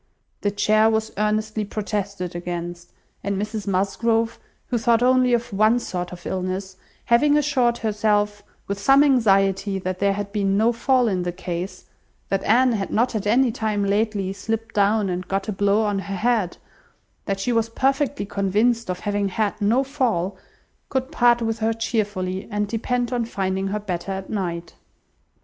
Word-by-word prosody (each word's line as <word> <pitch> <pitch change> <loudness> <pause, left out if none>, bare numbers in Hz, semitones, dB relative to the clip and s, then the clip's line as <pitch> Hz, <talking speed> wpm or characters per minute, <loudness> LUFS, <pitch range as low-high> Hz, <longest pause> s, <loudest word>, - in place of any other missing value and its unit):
The 205 - +1
chair 215 +2 +3
was 220 0 0
earnestly 215 +1 0
protested 200 -3 -4
against, 175 0 -5 0.3
and 200 -1 -1
Mrs 210 0 -4
Musgrove, 225 +4 0 0.3
who 240 - 0
thought 235 0 +3
only 255 0 +4
of 240 -2 0
one 215 +4 +4
sort 180 -7 -4
of 175 -1 -10
illness, 185 +1 -3 0.3
having 290 +5 +4
assured 260 -5 +2
herself 210 -1 0 0.3
with 200 0 -3
some 270 +7 +5
anxiety, 195 -7 +3
that 185 -1 -4
there 200 0 +2
had 200 0 -4
been 200 -1 +1
no 225 +3 +3
fall 250 +1 +2
in 190 -4 0
the 175 0 -2
case; 180 +1 -5 0.4
that 195 - 0
Anne 250 +4 +4
had 200 -4 -2
not 245 +3 +1
at 210 -2 -2
any 245 +3 +4
time 215 -2 -1
lately 200 -1 0
slipped 225 +3 -4
down, 205 0 +2
and 180 0 -3
got 195 +2 -2
a - - -1
blow 205 +2 +2
on 205 -2 0
her 195 0 -5
head; 215 -3 0 0.7
that 195 -1 -2
she 240 +5 0
was 230 0 +1
perfectly 270 0 0
convinced 210 +4 +1
of 180 0 -3
having 205 -1 -1
had 210 +2 -1
no 230 +6 +3
fall; 235 - -1 0.5
could 265 +1 -2
part 240 -5 +3
with 225 0 -1
her 225 0 +1
cheerfully, 205 -4 -2
and 210 -1 -1
depend 240 +3 -1
on 240 -1 0
finding 190 -3 -2
her 210 +2 -2
better 195 -2 -4
at 190 0 -6
night. 170 -4 -3
210 Hz, 170 wpm, -23 LUFS, 195-230 Hz, 0.7 s, some